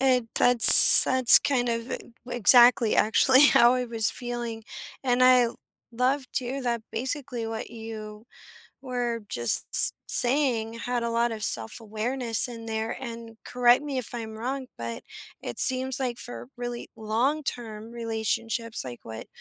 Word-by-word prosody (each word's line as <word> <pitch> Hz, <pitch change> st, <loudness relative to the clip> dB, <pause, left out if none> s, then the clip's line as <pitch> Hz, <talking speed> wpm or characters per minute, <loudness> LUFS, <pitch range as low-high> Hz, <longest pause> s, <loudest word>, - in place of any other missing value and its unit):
it 255 Hz, -3 st, 0 dB
that's 245 Hz, -1 st, +9 dB
that's 255 Hz, -1 st, +5 dB
kind 250 Hz, -4 st, -2 dB
of 230 Hz, +1 st, -5 dB
e -, -, -4 dB, 0.3 s
exactly 240 Hz, -1 st, +3 dB
actually 260 Hz, +6 st, +3 dB
how 240 Hz, -2 st, +3 dB
I 250 Hz, 0 st, -3 dB
was 225 Hz, -2 st, -2 dB
feeling. 240 Hz, -2 st, -8 dB, 0.4 s
And 255 Hz, -1 st, -1 dB
I 250 Hz, -2 st, +3 dB, 0.4 s
love 255 Hz, +3 st, -3 dB
too 260 Hz, +2 st, -5 dB
that 235 Hz, -2 st, -4 dB
basically 255 Hz, 0 st, -6 dB
what 225 Hz, 0 st, -8 dB
you 220 Hz, -1 st, -11 dB, 0.6 s
were 245 Hz, -3 st, -5 dB
just 120 Hz, -1 st, -2 dB
s -, -, +6 dB
saying 240 Hz, -4 st, 0 dB
had 240 Hz, +1 st, -5 dB
a 235 Hz, -, -4 dB
lot 235 Hz, 0 st, -2 dB
of 220 Hz, -1 st, -9 dB
self-awareness 225 Hz, -, -2 dB
in 230 Hz, -1 st, -11 dB
there, 220 Hz, 0 st, -5 dB
and 230 Hz, -2 st, -11 dB
correct 245 Hz, +1 st, +1 dB
me 285 Hz, -2 st, -7 dB
if 245 Hz, -2 st, -6 dB
I'm 225 Hz, -2 st, -8 dB
wrong, 260 Hz, +3 st, -6 dB
but 115 Hz, 0 st, -8 dB, 0.4 s
it 120 Hz, -, -9 dB
seems 260 Hz, 0 st, +1 dB
like 250 Hz, -2 st, -5 dB
for 120 Hz, 0 st, -10 dB
really 240 Hz, -1 st, -8 dB
long-term 230 Hz, -1 st, -5 dB
relationships, 230 Hz, -, -5 dB
like 120 Hz, -2 st, -11 dB
what 110 Hz, 0 st, -11 dB
235 Hz, 145 wpm, -24 LUFS, 225-250 Hz, 0.6 s, that's